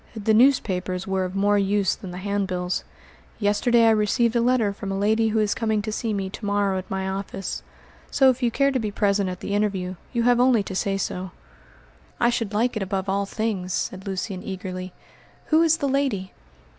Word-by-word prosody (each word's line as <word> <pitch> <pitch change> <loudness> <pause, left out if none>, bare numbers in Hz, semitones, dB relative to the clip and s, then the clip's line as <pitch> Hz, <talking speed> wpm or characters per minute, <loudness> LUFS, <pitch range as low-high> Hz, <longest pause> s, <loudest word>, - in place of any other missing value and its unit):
"The 220 0 +1
newspapers 190 -7 +2
were 190 -1 0
of 185 +1 -6
more 205 +1 +3
use 200 -1 +2
than 190 - -8
the 180 - -7
handbills. 185 -2 -2 0.5
Yesterday 230 +3 +3
I 225 - +6
received 220 +2 +2
a 235 - +3
letter 235 -4 +2
from 200 0 -6
a 195 - -2
lady 220 +3 +2
who 220 0 0
is 210 -1 +2
coming 220 -2 0
to 215 - -3
see 225 +1 -2
me 195 -2 -2
to 215 - -9
morrow 200 -2 +1
at 185 - -10
my 190 0 -2
office. 195 0 -4 0.5
So 265 -2 +5
if 255 +1 -6
you 240 - +3
care 275 +4 +2
to 260 - 0
be 215 -3 -2
present 200 -2 +1
at 180 -1 -6
the 200 - -3
interview 195 -3 -1
you 235 -2 0
have 245 0 +4
only 245 -4 +4
to 190 - -6
say 195 +1 0
so." 185 -1 -3 0.9
"I 240 - +3
should 230 -4 -2
like 235 +4 +1
it 215 - -2
above 190 0 -2
all 200 +1 0
things," 200 -5 -2
said 190 +2 -3
Lucian 190 0 -3
eagerly. 185 -2 -6 0.6
"Who 315 +1 +5
is 325 -1 +4
the 285 - -1
lady?" 260 -9 -1
205 Hz, 205 wpm, -24 LUFS, 190-230 Hz, 0.9 s, I